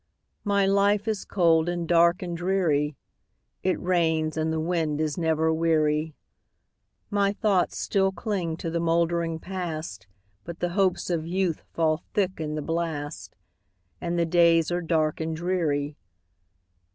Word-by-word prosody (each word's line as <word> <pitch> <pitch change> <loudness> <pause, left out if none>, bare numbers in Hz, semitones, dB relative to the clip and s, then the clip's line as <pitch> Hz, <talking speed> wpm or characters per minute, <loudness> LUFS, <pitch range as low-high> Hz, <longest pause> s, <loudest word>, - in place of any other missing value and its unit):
My 200 -2 +2
life 200 +2 +2
is 215 -3 -2
cold, 170 -3 +3
and 175 -1 -2
dark, 170 +3 +4
and 175 -1 -4
dreary; 165 -5 +1 0.7
It 185 -1 0
rains, 160 -3 +1
and 160 0 0
the 160 - -1
wind 160 -2 -1
is 155 -2 -1
never 160 -1 +1
weary; 155 -1 +1 1.0
My 200 -1 +2
thoughts 200 -4 +1
still 195 -1 +1
cling 175 -3 -3
to 165 - -4
the 170 - -1
moldering 170 0 +1
Past, 160 - -5 0.4
But 170 +5 -7
the 175 - 0
hopes 185 -1 +1
of 165 -2 -1
youth 180 -2 -1
fall 160 -1 +1
thick 190 -3 0
in 150 -1 -3
the 155 - -3
blast, 160 -3 -4 0.7
And 175 0 -2
the 170 - +2
days 165 -1 +4
are 175 0 0
dark 160 -2 0
and 160 0 -2
dreary. 160 -4 -1
170 Hz, 145 wpm, -26 LUFS, 160-180 Hz, 1.0 s, dark